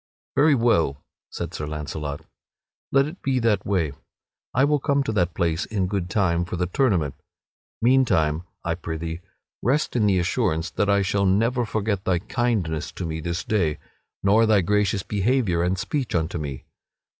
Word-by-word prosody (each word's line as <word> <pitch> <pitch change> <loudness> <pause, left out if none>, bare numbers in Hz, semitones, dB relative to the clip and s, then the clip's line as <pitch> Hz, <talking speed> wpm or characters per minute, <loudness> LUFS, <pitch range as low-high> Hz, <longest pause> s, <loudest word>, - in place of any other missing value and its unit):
"Very 150 +1 +5
well," 85 - +2 0.3
said - - -5
Sir 75 - -4
Launcelot, 75 -1 -5 0.7
"let 135 0 +4
it 155 +5 -8
be 135 -1 0
that 115 -4 +1
way. 90 -7 +1 0.6
I 130 +3 +3
will 150 0 +2
come 140 +1 +1
to 125 - -2
that 90 -5 0
place 85 -1 0
in 100 -4 -1
good 95 -2 -2
time 85 -3 +1
for 90 - -5
the 90 0 0
tournament. 90 - +1 0.7
Meantime, 100 -12 +3 0.2
I 85 - 0
prithee, 80 0 -5 0.4
rest 140 +4 +1
in 110 -4 +3
the 95 -2 +3
assurance 85 -3 0
that 100 - 0
I 100 0 +3
shall 100 +1 +1
never 115 +5 +2
forgot 105 -2 -1
thy 95 -2 +2
kindness 100 -6 -1
to 90 - -5
me 80 -1 -3
this 85 +2 -3
day, 85 -9 0 0.5
nor 110 +3 +4
thy 105 -3 +4
gracious 100 +1 +1
behavior 105 -4 +1
and 90 +2 +1
speech 130 +7 -2
unto 80 0 -1
me. 70 -4 -6
95 Hz, 170 wpm, -24 LUFS, 85-115 Hz, 0.7 s, Very